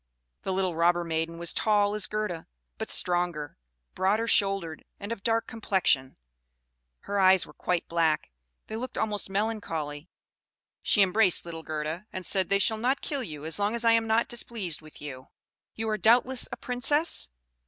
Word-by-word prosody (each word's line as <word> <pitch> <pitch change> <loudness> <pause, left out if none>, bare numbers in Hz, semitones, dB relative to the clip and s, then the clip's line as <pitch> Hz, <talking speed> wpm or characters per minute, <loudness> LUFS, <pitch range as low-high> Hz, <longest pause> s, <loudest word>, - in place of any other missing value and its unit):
The - - -3
little 185 -1 0
robber 175 +1 +3
maiden 165 0 -2
was 170 0 -2
as - - +4
tall 205 -1 +2
as 210 -2 0
Gerda, 210 -6 -3 0.3
but - - -4
stronger, 175 -4 0 0.4
broader 205 +4 +1
shouldered, 195 -7 +1 0.2
and 200 +2 -6
of 230 - -4
dark 225 +2 +1
complexion; 185 -12 0 0.8
her 200 0 -2
eyes 190 -1 +5
were - - -15
quite 180 -2 -1
black; 160 - +1 0.3
they 220 - -6
looked 250 +3 -5
almost 210 -3 -1
melancholy. 180 -8 -3 0.7
She 205 - +5
embraced 190 -1 +3
little 165 -1 -6
Gerda, 155 +5 -4
and 185 -1 -6
said, 190 0 +1
"They 200 - +4
shall 220 +3 +1
not 255 +5 0
kill 280 -2 -2
you 155 - -7
as 160 +5 +2
long 205 +3 +1
as 235 0 +1
I 230 - +6
am 225 0 +3
not 220 +1 +2
displeased 215 -9 -2
with 155 -1 -12
you. 130 -3 -8 0.5
You 225 0 -3
are, 215 0 -1
doubtless, 245 +3 +3
a 240 - -5
Princess?" 255 - +1
195 Hz, 175 wpm, -28 LUFS, 165-225 Hz, 0.8 s, I